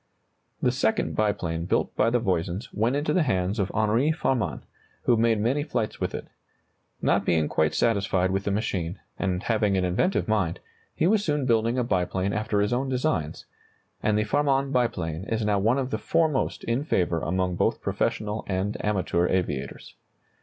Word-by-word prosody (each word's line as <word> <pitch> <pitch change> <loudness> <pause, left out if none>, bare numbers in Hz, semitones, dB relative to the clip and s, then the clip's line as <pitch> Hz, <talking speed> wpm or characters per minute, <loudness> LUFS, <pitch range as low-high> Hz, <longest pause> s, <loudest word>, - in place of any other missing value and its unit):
The - - +4
second - - 0
biplane 90 -6 -1
built - - 0
by - - +3
the 120 - +2
Voisins 95 0 -1
went 115 +6 +1
into 150 +1 0
the 185 - +3
hands 95 - 0
of 100 -1 0
Henri 110 +8 +2
Farman, 120 - -1 0.4
who 120 - +4
made 115 -1 +2
many 125 +7 +1
flights 145 -7 -3
with - - -1
it. - - -5 0.8
Not - - +3
being 80 -3 +2
quite 80 0 +1
satisfied 100 -4 +1
with 95 +1 -1
the - - +1
machine, 100 -4 -2 0.2
and 90 +1 -1
having 105 -4 +1
an 90 - +1
inventive 100 - +1
mind, 105 -7 0 0.4
he - - +1
was 205 +3 +3
soon 150 -6 0
building 115 0 +2
a 125 - +2
biplane 95 -2 0
after 105 -1 0
his 105 +3 +1
own 130 +2 0
designs, 125 - -1 0.6
and 105 -1 +2
the 105 - +2
Farman 140 +3 +1
biplane 90 - -1
is 110 0 -1
now 105 -1 +2
one 115 +6 +2
of 135 -1 -2
the 110 - -1
foremost 155 +4 0
in 120 +4 0
favor 90 - +1
among 90 +2 -1
both - - +1
professional 105 0 -2
and 95 +2 -2
amateur 95 -4 +1
aviators. 90 -8 -2
105 Hz, 175 wpm, -26 LUFS, 95-125 Hz, 0.8 s, The